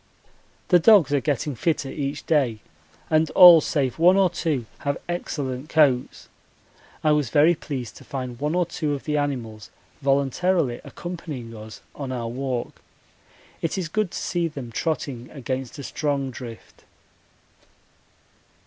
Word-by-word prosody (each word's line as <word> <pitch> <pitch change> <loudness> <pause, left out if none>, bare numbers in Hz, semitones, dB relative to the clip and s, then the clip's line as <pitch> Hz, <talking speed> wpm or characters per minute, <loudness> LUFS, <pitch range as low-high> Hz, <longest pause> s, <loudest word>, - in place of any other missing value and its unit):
The 180 - +6
dogs 180 - +6
are 145 - +3
getting 145 0 -1
fitter 140 +2 -1
each 140 0 -4
day, 135 -8 +2 0.5
and 155 0 +3
all 175 -3 +10
save 140 -2 -1
one 180 +3 +6
or 190 -3 +4
two 155 -8 -1
have 140 0 -2
excellent 145 -5 -4
coats. 140 -6 +2 0.8
I 155 - +4
was 150 -5 +1
very 150 +6 +5
pleased 135 -7 -6
to - - -13
find 125 -3 -6
one 150 +3 -1
or 180 -1 +2
two 150 -3 -2
of 140 - -8
the 150 -1 -1
animals 120 -7 -3 0.3
voluntarily 140 +1 +1
accompanying 150 -10 -7
us 110 0 -10
on 135 -3 -6
our 120 -2 -3
walk. 125 0 -4 0.8
It 165 - -2
is 175 -3 -3
good 215 +2 0
to - - -7
see 175 -1 -1
them 135 -7 -8
trotting 130 -3 -3
against 130 -2 -5
a 140 - -7
strong 140 -2 -2
drift. 120 -2 -11
145 Hz, 145 wpm, -24 LUFS, 130-160 Hz, 0.8 s, all